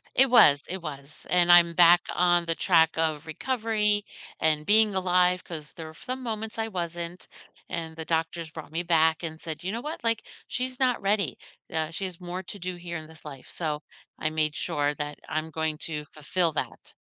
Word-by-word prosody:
It 265 +1 +6
was, 145 - +7
it 185 0 -4
was, 140 -2 -9
and 175 -1 +5
I'm 170 -1 +7
back 175 0 +7
on 175 -1 +3
the 165 0 0
track 160 -4 +3
of 160 -1 0
recovery 210 - 0 0.3
and 155 -1 +2
being 215 0 +5
alive 180 -1 +2
'cause 155 -3 -8
there 160 - -8
were 160 - -10
some 255 +9 -6
moments 220 -1 -4
I 225 0 -1
wasn't, 175 -2 -5 0.4
and 160 -1 -4
the 160 -1 -6
doctors 165 0 -1
brought 160 -2 -10
me 165 +2 -1
back 160 -2 +3
and 160 -2 -5
said, 160 0 -6
"You 190 - -2
know 230 +2 -3
what? 300 -4 -6
Like, 230 -1 0 0.2
she's 255 0 -3
not 255 -2 +2
ready, 200 -4 +1 0.3
uh 160 0 -1
she 190 +4 -3
has 180 -2 -7
more 180 +1 -5
to 190 - -8
do 185 -1 -4
here 175 0 -6
in 155 - -7
this 160 0 -16
life," 140 -4 -10
so 150 -3 -3 0.3
I 155 - -1
made 155 -1 0
sure 145 0 -1
that 150 0 -5
I'm 155 +1 -2
going 160 0 -1
to 150 -2 -4
fulfill 160 +3 -1
that. - - -5
170 Hz, 200 wpm, -27 LUFS, 160-190 Hz, 0.4 s, was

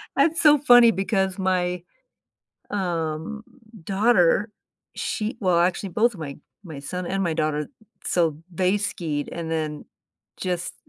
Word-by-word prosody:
That's 325 +4 +3
so 300 -2 +7
funny 245 -4 +7
because 195 -2 -1
my, 180 -2 0 0.9
um, 170 +1 -3 0.4
daughter, 205 0 +3 0.4
she 215 +3 -3
well, 180 -3 +2
actually, 180 +2 0
both 225 +4 +1
my 145 -5 -6 0.3
my 155 -5 -8
son 180 +5 -5
and 195 +1 -1
my 170 -3 0
daughter 155 -2 -1 0.4
so, 165 -4 +1 0.2
they 185 +3 +2
skied, 155 -7 -3
and 165 -1 -5
then, 155 -2 -3 0.5
just 180 -1 -3
180 Hz, 125 wpm, -24 LUFS, 165-205 Hz, 0.9 s, so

